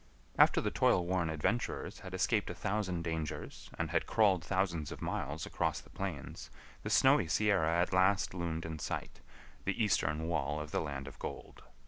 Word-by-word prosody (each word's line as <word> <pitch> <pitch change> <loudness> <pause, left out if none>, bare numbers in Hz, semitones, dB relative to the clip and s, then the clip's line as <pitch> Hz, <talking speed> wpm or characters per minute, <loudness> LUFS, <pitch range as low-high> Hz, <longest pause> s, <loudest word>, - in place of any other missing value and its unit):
After - - +5
the - - -1
toil 90 - +3
worn 90 -2 0
adventurers 80 +10 -1
had 95 0 -7
escaped 105 +3 +1
a 90 - -5
thousand 95 -2 -1
dangers 80 -2 -4
and 85 -2 -2
had 80 - +1
crawled 100 -6 +3
thousands 90 -6 -1
of - - -7
miles 75 +3 -3
across - - -1
the - - -17
plains 75 -9 -5 0.3
the 105 - -4
snowy 120 - +5
Sierra 85 -3 +2
at 90 - +1
last 95 +2 +3
loomed 85 -2 -3
in 80 -1 -5
sight, - - -4 0.4
the 100 +4 0
eastern 80 -6 +1
wall 75 -3 -1
of 75 0 -6
the - - 0
land 70 -3 -5
of 70 - -10
gold. - - -7
85 Hz, 175 wpm, -33 LUFS, 80-100 Hz, 0.4 s, After